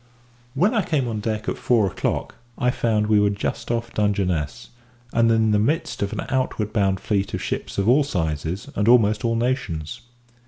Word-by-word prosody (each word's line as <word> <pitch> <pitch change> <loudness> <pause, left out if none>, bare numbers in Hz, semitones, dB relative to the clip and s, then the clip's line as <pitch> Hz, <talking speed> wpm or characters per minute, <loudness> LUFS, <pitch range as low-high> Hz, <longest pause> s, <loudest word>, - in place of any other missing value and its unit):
When 180 - +3
I 225 - +2
came 150 -8 0
on 110 -2 -3
deck 110 0 -3
at - - -2
four 115 -4 +3
o'clock 95 - -2 0.2
I 125 -2 +2
found 110 -3 +1
we 105 -1 +4
were 105 0 +3
just 100 0 -3
off 115 0 -2
Dungeness, 100 -3 -1 0.4
and 115 0 +3
in 110 -1 +3
the 105 - +3
midst 155 +10 -1
of 100 0 -1
an - - -3
outward 130 -5 -1
bound 95 -3 +1
fleet 100 -1 -1
of - - -5
ships - - -4
of 100 +1 +1
all 135 +5 +5
sizes 80 - -3
and 105 +1 0
almost 110 -3 +4
all 115 -1 +1
nations. 115 - -2
110 Hz, 190 wpm, -23 LUFS, 100-120 Hz, 0.4 s, all